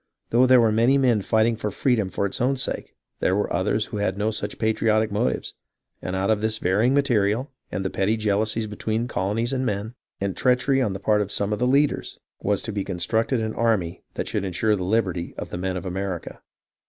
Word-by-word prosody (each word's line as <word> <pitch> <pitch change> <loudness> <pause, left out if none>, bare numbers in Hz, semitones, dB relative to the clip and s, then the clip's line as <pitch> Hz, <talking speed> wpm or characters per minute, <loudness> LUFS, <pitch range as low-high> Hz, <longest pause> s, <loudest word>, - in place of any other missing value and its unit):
Though 125 +2 +5
there 130 -1 +7
were 115 -2 +4
many 120 +5 +4
men 125 -6 +3
fighting 110 +3 +2
for 105 -1 -3
freedom 110 -2 +1
for 95 - -1
its 100 - -3
own 135 +2 +2
sake, - - -4 0.2
there 95 - +2
were 105 - -1
others 105 +4 +1
who - - -6
had 100 -2 -1
no 105 +2 0
such 110 - -4
patriotic 110 -1 +1
motives, 100 -11 -1 0.5
and 90 - -3
out 95 +3 +1
of 105 -1 +1
this 110 0 0
varying 110 +8 +2
material, 125 -2 +1 0.2
and 95 0 -3
petty 105 +4 +1
jealousies 110 +1 0
between 110 +2 -2
colonies 115 +4 -1
and 130 -1 0
men, 105 -1 -2 0.3
and 100 -1 -2
treachery 130 +2 +2
on 105 -6 0
the 95 - -5
part 105 +1 +2
of 100 - -3
some 100 +1 0
of 105 - -3
the 125 - +2
leaders, 140 +3 +1 0.2
was 100 -1 0
to 110 - -3
be 100 -1 -1
constructed 110 +7 0
an 110 0 -2
army 110 -8 0
that - - -3
should - - -1
insure 100 +3 +1
the 95 - -5
liberty 95 -4 -1
of - - -6
the - - -3
men 95 0 -2
of 90 - -6
America. 95 -1 -4
110 Hz, 215 wpm, -24 LUFS, 100-115 Hz, 0.5 s, there